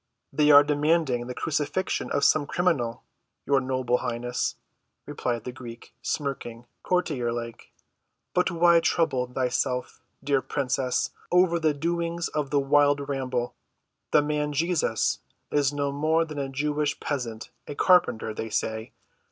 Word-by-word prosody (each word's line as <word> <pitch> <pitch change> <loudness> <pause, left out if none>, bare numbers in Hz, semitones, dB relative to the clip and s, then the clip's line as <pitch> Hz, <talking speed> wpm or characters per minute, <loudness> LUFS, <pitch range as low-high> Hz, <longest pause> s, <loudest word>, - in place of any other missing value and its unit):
"They 150 -1 +3
are 145 0 +9
demanding 145 -4 +1
the 125 - -5
crucifixion 155 +5 -1
of 140 - 0
some 145 -2 +4
criminal, 150 -12 0 0.4
your 140 -1 +3
noble 130 -1 0
highness," 120 0 -2 0.5
replied 120 -3 -3
the 125 - -5
Greek, 120 -2 -11
smirking 125 -5 -4 0.2
courtier‐like. 120 -10 -2 0.6
"But 180 +1 +2
why 170 0 +5
trouble 145 -7 +1
thyself, 125 0 -1 0.2
dear 140 -2 +2
princess, 130 -2 -1 0.2
over 180 -1 +4
the 155 -2 +1
doings 170 +2 -2
of 150 -3 -2
the 145 - +2
wild 145 0 +3
rabble? 130 -3 -2 0.6
The 150 - +4
man, 150 0 -1
Jesus, 160 - +1 0.3
is 145 -2 +2
no 145 -1 -1
more 155 +3 +1
than 155 -2 -6
a 135 -1 -2
Jewish 150 +2 -1
peasant—a 125 0 -5
carpenter, 160 - +3
they 110 +1 -5
say. 110 +1 -3
140 Hz, 130 wpm, -26 LUFS, 125-155 Hz, 0.6 s, are